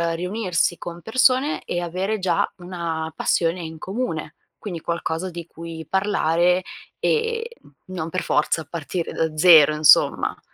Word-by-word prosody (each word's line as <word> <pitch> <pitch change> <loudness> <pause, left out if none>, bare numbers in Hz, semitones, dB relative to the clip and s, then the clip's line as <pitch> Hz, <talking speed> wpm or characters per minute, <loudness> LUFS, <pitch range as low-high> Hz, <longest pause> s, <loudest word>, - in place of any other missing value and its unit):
riunirsi 180 -1 -1
con 170 0 -8
persone 255 - +2
e 175 - -3
avere 185 +5 -2
già 185 -1 0
una 170 -3 -4
passione 170 +1 0
in 160 -1 -7
comune, 180 -5 -4 0.2
quindi 175 -6 -6
qualcosa 170 +1 -3
di 170 -1 -7
cui 165 -1 -9
parlare 180 -2 +2 0.4
e 460 0 0
n - - -19 0.3
non 165 -2 -3
per 185 +2 -2
forza 155 +1 0
partire 170 +1 -4
da 160 -1 -1
zero 155 -3 +7
insomma. 150 0 +4
175 Hz, 135 wpm, -22 LUFS, 160-190 Hz, 0.4 s, zero